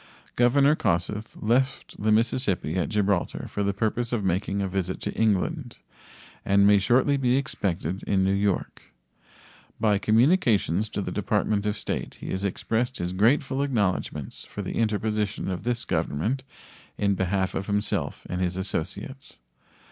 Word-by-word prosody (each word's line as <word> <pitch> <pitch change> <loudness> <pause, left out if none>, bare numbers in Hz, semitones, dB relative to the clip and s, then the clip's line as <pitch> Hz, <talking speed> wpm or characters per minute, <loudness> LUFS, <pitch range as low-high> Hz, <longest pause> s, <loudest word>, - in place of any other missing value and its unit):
Governor 140 +5 +4
Kossuth 105 - -1
left 130 +5 0
the 110 +1 +2
Mississippi 105 - +1
at 90 - 0
Gibraltar 100 -3 0
for 105 - -4
the 100 0 +1
purpose 110 +4 -1
of 115 -4 -1
making 95 +2 0
a 100 - 0
visit 95 -1 -2
to - - -3
England, 115 - 0 0.7
and 100 0 +4
may 100 0 +6
shortly 125 +7 +3
be 130 -1 +2
expected 95 - -2
in 95 -1 +2
New 95 +1 +2
York. 100 -1 -1 1.0
By 105 -3 +3
communications 110 - +3
to 100 - -3
the - - -4
Department 105 -1 0
of 105 - -1
State - - -4
he - - -7
has 95 +1 -2
expressed 115 +5 -1
his 90 +1 -3
grateful 130 +7 +2
acknowledgments 100 - -1
for - - -7
the - - -4
interposition 105 -2 -1
of 90 - -3
this 120 -1 -1
Government 85 - -1 0.6
in 100 -1 +2
behalf 95 0 0
of 95 - -3
himself 105 0 -1
and 90 0 -3
his 90 0 -1
associates. 100 - -4
105 Hz, 150 wpm, -26 LUFS, 95-120 Hz, 1.0 s, may